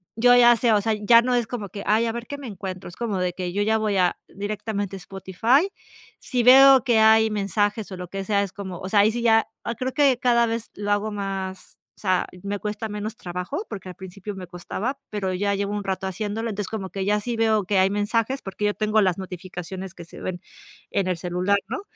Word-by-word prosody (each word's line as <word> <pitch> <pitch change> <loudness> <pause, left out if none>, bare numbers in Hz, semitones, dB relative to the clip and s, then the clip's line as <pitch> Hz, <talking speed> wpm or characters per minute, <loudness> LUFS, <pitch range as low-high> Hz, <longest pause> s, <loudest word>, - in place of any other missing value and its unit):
yo 245 +2 +5
ya 240 -1 +7
sé, 235 0 +2
o 210 - +4
sea, 220 +2 +1
ya 215 +2 +5
no 250 +1 0
es 240 -2 0
como 215 -5 -5
que: 200 +2 -7
"Ay, 220 +2 +3
a 230 - 0
ver 235 +1 -6
qué 285 - -5
me 280 -2 -8
encuentro", 190 -3 -6
es 175 - -13
como 220 -5 -2
de 180 -1 -1
que 180 -1 -4
yo 205 +2 +1
ya 220 +1 +2
voy 210 -2 0
a 180 -1 +2
directamente 205 0 -4
a - - -10
Spotify. 195 - +1 0.5
Si 245 -2 -1
veo 265 +1 +8
que 240 -4 +3
hay 220 0 +6
mensajes, 205 +1 -1
o 185 - -6
lo 180 -1 -7
que 195 +1 -4
sea, 200 0 +1
es 195 - -6
como, 190 -4 -7
o 185 - -6
sea, 205 - +3
ahí 210 +2 +4
sí 240 +1 -3
ya 225 -1 +4 0.3
creo 255 0 -3
que 275 -4 +3
cada 240 -2 +3
vez 230 0 -3
lo 205 0 -3
hago 205 +1 0
más, 195 -2 -5 0.2
o - - -21
sea, 185 -3 +1 0.2
me 200 0 -3
cuesta 215 +2 -4
menos 210 +2 -5
trabajo, 180 - -5
porque 195 -3 -7
al 180 - -9
principio 190 +3 -8
me 185 -1 -7
costaba, 190 +9 -4
pero 195 -3 -2
ya 200 +2 0
llevo 200 +1 -2
un 205 - -3
rato 190 0 -3
haciéndolo. 210 +4 -3
Entonces 205 -1 -4
como 200 -4 -5
que 195 -1 -3
ya 210 +1 +2
sí 235 +3 -3
veo 220 -2 +2
que 195 +1 +2
hay 190 +1 +4
mensajes, 225 +6 0
porque 195 +2 -4
yo 205 - +2
tengo 215 0 +2
las 185 -3 +2
notificaciones 185 0 -7
que 170 - -10
se - - -12
ven 180 -2 -4 0.5
en 195 -2 0
el 180 -2 0
celular, 180 +3 0
¿no? 260 - -3
205 Hz, 240 wpm, -24 LUFS, 190-225 Hz, 0.5 s, veo